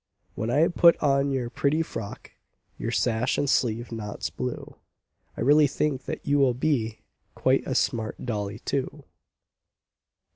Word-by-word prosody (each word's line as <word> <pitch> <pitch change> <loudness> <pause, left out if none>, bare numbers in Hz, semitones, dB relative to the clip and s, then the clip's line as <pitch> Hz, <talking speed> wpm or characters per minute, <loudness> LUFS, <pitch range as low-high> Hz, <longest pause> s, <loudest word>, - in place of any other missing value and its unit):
When 110 - -3
I 150 +7 +4
put 170 -1 +5
on 140 -1 +2
your 130 -3 -2
pretty 150 +5 +1
frock, 115 -9 -8 0.5
Your 115 - -2
sash, 115 +2 0
and 145 - 0
sleeve 120 -3 0
knots 105 -3 -5
blue, 65 0 -5 0.6
I - - -4
really 145 +2 +5
think 140 -1 -2
that - - -5
you 145 0 +2
will 130 -3 +3
be 125 -5 -1 0.3
Quite - - +1
a - - -2
smart 110 0 -1
dolly 105 -3 -3
too. 140 +4 -3
125 Hz, 145 wpm, -26 LUFS, 110-145 Hz, 0.6 s, put